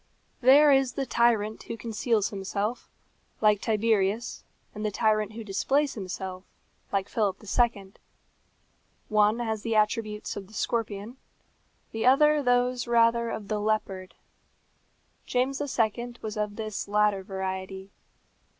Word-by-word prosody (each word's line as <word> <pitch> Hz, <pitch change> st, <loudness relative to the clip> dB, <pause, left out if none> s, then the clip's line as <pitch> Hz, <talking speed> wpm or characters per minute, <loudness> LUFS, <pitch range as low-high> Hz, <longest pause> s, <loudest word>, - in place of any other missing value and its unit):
There 280 Hz, +4 st, +7 dB
is 270 Hz, -2 st, +3 dB
the 275 Hz, -, -2 dB
tyrant 230 Hz, -3 st, +1 dB
who 230 Hz, -, -7 dB
conceals 225 Hz, -1 st, 0 dB
himself, 200 Hz, +3 st, -3 dB, 0.5 s
like 210 Hz, -2 st, +3 dB
Tiberius; 220 Hz, 0 st, 0 dB, 0.3 s
and 210 Hz, -, -6 dB
the 215 Hz, -, +1 dB
tyrant 215 Hz, 0 st, +1 dB
who 225 Hz, +1 st, -7 dB
displays 270 Hz, +8 st, 0 dB
himself, 185 Hz, -2 st, -6 dB, 0.5 s
like 195 Hz, -1 st, 0 dB
Philip 205 Hz, -4 st, 0 dB
II. 205 Hz, -3 st, 0 dB, 1.2 s
One 210 Hz, +1 st, +3 dB
has 220 Hz, -3 st, -2 dB
the 230 Hz, 0 st, -2 dB
attributes 215 Hz, 0 st, 0 dB
of 195 Hz, -2 st, -7 dB
the 215 Hz, -, -15 dB
scorpion, 220 Hz, +1 st, -3 dB, 0.7 s
the 225 Hz, +2 st, -1 dB
other 300 Hz, +3 st, +5 dB
those 245 Hz, -1 st, +1 dB
rather 235 Hz, 0 st, +3 dB
of 215 Hz, -3 st, -5 dB
the 215 Hz, 0 st, -1 dB
leopard. 205 Hz, -3 st, -2 dB, 1.1 s
James 265 Hz, +3 st, 0 dB
II. 240 Hz, -3 st, -1 dB
was 215 Hz, 0 st, -4 dB
of 210 Hz, -1 st, -2 dB
this 215 Hz, -2 st, -4 dB
latter 210 Hz, -1 st, +2 dB
variety. 190 Hz, 0 st, -5 dB
215 Hz, 125 wpm, -27 LUFS, 205-240 Hz, 1.2 s, There